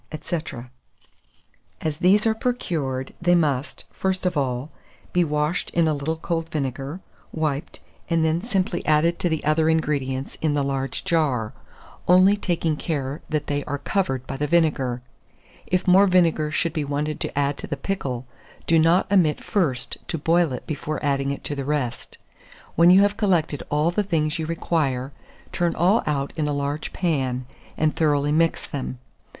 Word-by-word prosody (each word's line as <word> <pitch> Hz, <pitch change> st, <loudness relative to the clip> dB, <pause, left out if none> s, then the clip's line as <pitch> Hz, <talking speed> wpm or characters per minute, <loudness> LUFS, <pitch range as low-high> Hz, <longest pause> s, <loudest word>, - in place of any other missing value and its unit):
&c. -, -, -3 dB, 1.4 s
As 155 Hz, -1 st, -3 dB
these 195 Hz, +5 st, +4 dB
are 220 Hz, -, +4 dB
procured, 160 Hz, -, -2 dB
they 175 Hz, 0 st, +4 dB
must, 145 Hz, -5 st, 0 dB
first 190 Hz, -1 st, -1 dB
of 180 Hz, -1 st, +1 dB
all, 135 Hz, 0 st, -1 dB, 0.4 s
be 180 Hz, -, +4 dB
washed 150 Hz, +2 st, -1 dB
in 170 Hz, -2 st, +4 dB
a 155 Hz, -, +2 dB
little 145 Hz, +3 st, -2 dB
cold 165 Hz, 0 st, -3 dB
vinegar, 140 Hz, +2 st, -3 dB, 0.3 s
wiped, 155 Hz, -3 st, -3 dB, 0.3 s
and 165 Hz, -1 st, +2 dB
then 160 Hz, +2 st, +1 dB
simply 190 Hz, -5 st, -1 dB
added 155 Hz, +3 st, +3 dB
to 175 Hz, -, +1 dB
the 160 Hz, -2 st, -2 dB
other 155 Hz, +1 st, +3 dB
ingredients 140 Hz, -4 st, -1 dB
in 155 Hz, -2 st, +1 dB
the 145 Hz, -, +1 dB
large 135 Hz, -1 st, -2 dB
jar, 135 Hz, -10 st, +1 dB, 0.5 s
only 185 Hz, +3 st, +6 dB
taking 170 Hz, -5 st, -1 dB
care 145 Hz, -2 st, -3 dB
that 150 Hz, -2 st, -1 dB
they 145 Hz, 0 st, -1 dB
are 145 Hz, -, -2 dB
covered 140 Hz, -5 st, -1 dB
by 135 Hz, -, -5 dB
the 150 Hz, +1 st, -1 dB
vinegar. 140 Hz, -7 st, +1 dB, 0.6 s
If 185 Hz, +1 st, 0 dB
more 190 Hz, +2 st, +6 dB
vinegar 170 Hz, -4 st, +3 dB
should 165 Hz, +1 st, -1 dB
be 155 Hz, -3 st, -1 dB
wanted 145 Hz, +1 st, -2 dB
to -, -, -4 dB
add 140 Hz, 0 st, +1 dB
to -, -, -6 dB
the 145 Hz, -, -3 dB
pickle, 135 Hz, -8 st, -3 dB, 0.4 s
do 165 Hz, 0 st, +4 dB
not 165 Hz, +4 st, +4 dB
omit 175 Hz, -7 st, +3 dB
first 135 Hz, -11 st, -1 dB
to 165 Hz, -, -2 dB
boil 165 Hz, +1 st, +2 dB
it 125 Hz, -, -5 dB
before 155 Hz, -1 st, -3 dB
adding 140 Hz, -1 st, +1 dB
it 140 Hz, -, -4 dB
to 145 Hz, -, -4 dB
the 140 Hz, -, -3 dB
rest. 135 Hz, -4 st, -3 dB, 0.6 s
When 170 Hz, +2 st, +6 dB
you 185 Hz, +2 st, +8 dB
have 205 Hz, +1 st, +2 dB
collected 175 Hz, -9 st, +1 dB
all 150 Hz, +3 st, +2 dB
the 210 Hz, -, +1 dB
things 165 Hz, -5 st, 0 dB
you 160 Hz, -, -2 dB
require, 145 Hz, -6 st, -1 dB, 0.4 s
turn 175 Hz, -1 st, 0 dB
all 190 Hz, +7 st, +3 dB
out 140 Hz, -2 st, -1 dB
in 155 Hz, -2 st, -1 dB
a 145 Hz, -, 0 dB
large 145 Hz, +1 st, -2 dB
pan, 130 Hz, -8 st, -1 dB, 0.3 s
and 155 Hz, 0 st, +1 dB
thoroughly 145 Hz, -2 st, +2 dB
mix 165 Hz, +2 st, +2 dB
them. 130 Hz, -2 st, -5 dB
155 Hz, 170 wpm, -23 LUFS, 140-170 Hz, 1.4 s, you